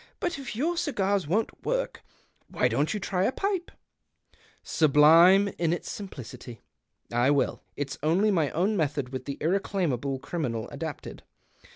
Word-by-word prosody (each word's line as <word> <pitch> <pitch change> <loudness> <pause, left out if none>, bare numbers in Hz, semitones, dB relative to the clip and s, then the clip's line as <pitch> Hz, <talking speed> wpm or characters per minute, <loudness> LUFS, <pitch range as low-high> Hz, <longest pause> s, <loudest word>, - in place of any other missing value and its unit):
But 350 -6 -2
if 265 -4 -6
your 330 +9 0
cigars 200 - 0
won't 210 +8 -1
w^ork, - - -2 0.5
why - - +1
don't 145 +2 0
you 215 - -2
try 190 -1 0
a - - +2
pipe? 390 +2 -2 0.3
" - - -52
" - - -32 0.2
Sublime 165 +6 +6
in 170 -2 +1
its 175 - -4
simplicity! 125 - -9 0.5
I 120 +3 +3
will. 140 -1 +1
It's 145 0 -4
only 180 +8 +2
my 160 -7 +2
own 190 +7 0
method 145 -6 -1
with 130 -1 -6
the 140 - -5
irreclaimable 160 - -1
criminal 130 -6 -3
adapted. 150 0 -6
170 Hz, 155 wpm, -27 LUFS, 140-205 Hz, 0.5 s, Sublime